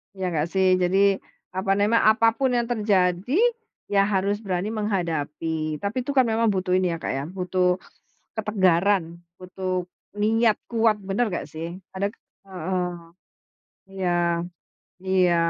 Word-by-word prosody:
Ya 190 -1 -2
nggak 160 -3 0
sih, 190 -1 +4
jadi, 185 +1 +2 0.6
apa 190 +1 0
nema 210 +3 +3
apapun 230 +4 +2
yang 240 -1 +1
terjadi, 205 - +1 0.5
ya 200 -1 +3
harus 200 +1 0
berani 185 -1 -2
menghadapi, 160 -6 -2
tapi 215 +5 -2
itu 285 - -3
kan 260 -3 +4
memang 225 0 +2
butuh 185 -1 0
ini 185 -1 +2
ya 165 - -2
Kak - - -3
ya, 135 - -2
butuh 180 -1 0 0.6
ketegaran. 190 -4 +1 0.2
Butuh 185 0 -3 0.3
niat 220 +1 +3
kuat, 225 -2 +2
benar, 195 +5 0
nggak 180 - -3
sih? 165 +3 -6 0.2
Ada 200 +1 +1 0.4
heeh. 185 0 -2 1.0
Iya 190 -2 -1 0.9
iya. 185 -2 +3
190 Hz, 130 wpm, -24 LUFS, 180-215 Hz, 1.0 s, sih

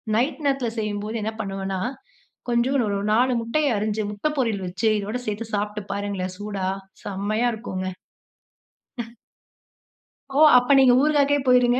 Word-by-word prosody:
Night 260 +5 0
நேரத்தில 270 -4 +1
செய்யும்போது 210 +1 -3
என்ன 220 +1 -2
பண்ணுவேன்னா, 195 -2 -3 0.7
கொஞ்சம் 240 +3 +2
ஒரு 200 -1 -1
4 250 +4 +3
முட்டையை 280 +6 0
அரிஞ்சு, 215 +1 -1
முட்டை 210 +9 -1
பொரியல் 220 -7 0
வச்சு 185 +5 0
இதோடு 210 +5 -3
சேர்த்து 215 +1 -4
சாப்பிட்டு 210 +1 -2
பாருங்களேன் 200 -2 -3
சூடா. 205 -2 -3 0.4
செம்மையா 205 +4 0
இருக்குங்க. 185 -4 -4 1.1
ம். 235 0 -6 1.1
ஓ! 270 +1 -1 0.2
அப்போ 250 +2 +2
நீங்க 260 -2 +6
ஊறுகாக்கே 290 -1 +3
போய்ருங்க. 250 0 +5
220 Hz, 130 wpm, -24 LUFS, 205-250 Hz, 1.1 s, நீங்க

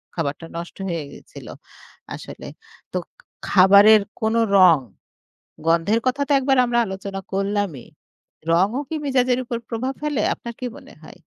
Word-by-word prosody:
খাবারটা 160 -1 -3
নষ্ট 170 0 -7
হয়ে 165 -3 -3
গিয়েছিল - - -13 0.7
আসলে। - - -10 0.5
তো - - 0 0.5
খাবারের 200 +3 +7 0.2
কোনো 220 +1 +1 0.2
রং, 180 -4 +7 0.9
গন্ধের 170 +7 +2
কথা 265 +3 0
তো - - -3
একবার 270 0 +1
আমরা 240 0 +1
আলোচনা 195 0 -6
করলামই। 195 - -2 0.7
রংও 195 +9 +2
কি 320 - -3
মেজাজের 255 -2 +1
উপর 235 0 -3
প্রভাব 250 +3 -3
ফেলে 295 -7 -1
আপনার 235 - -8
কি 250 - -2
মনে - - -15
হয়? - - -14
205 Hz, 140 wpm, -22 LUFS, 185-245 Hz, 0.9 s, খাবারের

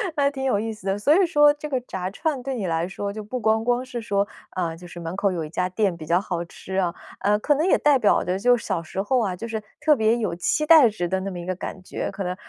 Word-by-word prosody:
嗯， 280 -2 +2
挺 265 -1 -5
有 250 -7 +2
意 225 +1 -2
思 215 -3 -9
的， 195 - +1
所 280 +9 +4
以 - - +4
说 295 -3 +5
这 295 +1 -7
个 265 -3 0
炸 185 -6 -4
串， 295 - -2
对 270 0 -3
你 215 -6 -3
来 165 +1 0
说 200 +1 -4
就 215 +1 -6
不 250 +5 -4
光 220 0 +2
光 245 +1 +1
是 250 -2 -6
说 200 -2 0 0.3
呃， 170 -3 -1
就 175 +1 -11
是 175 - -10
门 165 +1 -5
口 200 0 +1
有 170 -3 -3
一 155 - -7
家 180 +3 -1
店 190 -1 0
比 160 - -8
较 170 +3 +3
好 175 -4 -3
吃 190 +2 -9
啊。 180 -3 +1 0.3
呃， 210 +1 +2
可 290 +7 +2
能 305 +4 +1
也 375 - +4
代 295 -2 +4
表 210 - +3
的 185 +1 -1
就 245 +4 +5
是 235 - -7
小 185 -5 -1
时 180 +4 -4
候 250 +6 +1
啊， 195 -6 -1
就 225 +6 -6
是 220 -1 -3 0.2
特 305 -1 +5
别 220 -1 +2
有 215 -7 -2
期 305 - 0
待 305 -6 +8
值 190 -5 -3
的 190 +1 0
那 195 +1 -4
么 175 - -6
一 170 - -7
个 185 +1 -2
感 185 +1 -7
觉。 - - -4
可 195 0 -5
能 180 0 -3
205 Hz, 320 characters per minute, -24 LUFS, 185-250 Hz, 0.3 s, 待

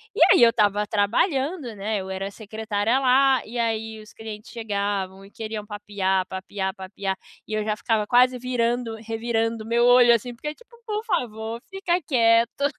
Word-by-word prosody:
E - - -2
aí, - - +6
eu 230 - +7
estava 210 -2 +2
trabalhando, 260 - 0
né, 210 +2 -2
eu 190 - -8
era 190 +1 -3
secretária 220 +3 -1
lá, 265 0 +4
e 240 +2 -7
aí, 220 -1 -2
os 215 - -15
clientes 215 -1 -9
chegavam 200 -3 -3
e 200 - -17
queriam 215 -2 -6
papear, 200 -3 -1
papear, 190 0 -4
papear, 190 0 -4 0.3
e 215 - -6
eu 215 0 0
já 215 -1 0
ficava 220 -2 0
quase 250 +1 +4
virando, 240 -2 -1
revirando 225 0 -2
meu 235 +1 +2
olho, 245 -1 +7
assim, 240 +2 -1
porque 300 +5 -5
tipo: 480 0 -20
"Por 425 0 -3
favor, 225 - -2
fica 370 -2 -1
quieto". 235 0 +2
225 Hz, 170 wpm, -24 LUFS, 205-245 Hz, 0.3 s, eu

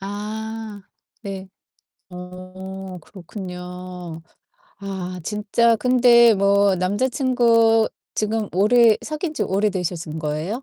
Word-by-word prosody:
아 215 +1 -6 0.4
네. 195 -2 -7 0.6
어 185 +1 -9
그렇군요. 180 -2 -8 0.6
아 185 -2 -6
진짜 210 +5 +1
근데 235 -1 +5
뭐 200 0 +3
남자 200 +8 0
친구 230 -4 +3 0.3
지금 215 0 -1
오래 220 +3 +5
사귄지 310 0 -3
오래되신 180 -5 -2
거예요? 155 - -3
200 Hz, 175 characters per minute, -22 LUFS, 185-225 Hz, 0.6 s, 근데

